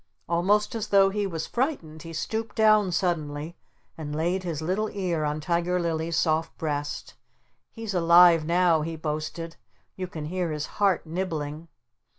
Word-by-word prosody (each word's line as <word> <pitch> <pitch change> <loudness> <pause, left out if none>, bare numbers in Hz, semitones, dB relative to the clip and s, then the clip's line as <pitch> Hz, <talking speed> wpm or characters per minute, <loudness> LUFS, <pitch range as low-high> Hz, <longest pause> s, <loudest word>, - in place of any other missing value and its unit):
Almost 200 +7 +2
as 220 -2 -3
though 195 -1 +5
he 205 0 -1
was 165 -4 -4
frightened 235 - -2
he 165 - -8
stooped 220 +7 -3
down 215 -3 +4
suddenly 160 -3 -2 0.4
and 150 -2 -5
laid 175 +4 0
his 170 -5 -4
little 190 +7 -1
ear 180 -6 -2
on 150 0 -1
Tiger 175 +3 0
Lily's 165 -1 -1
soft 160 0 0
breast. 145 -2 -3 0.6
"He's 225 -3 -5
alive 170 -1 +6
now!" 170 0 +3
he 165 +2 -3
boasted. 160 +2 -4 0.4
"You 185 -1 -4
can 155 -4 -6
hear 180 +1 -2
his 150 -1 -3 0.2
heart 195 -4 +3
nibbling!" 160 -2 -4
170 Hz, 155 wpm, -26 LUFS, 155-190 Hz, 0.6 s, alive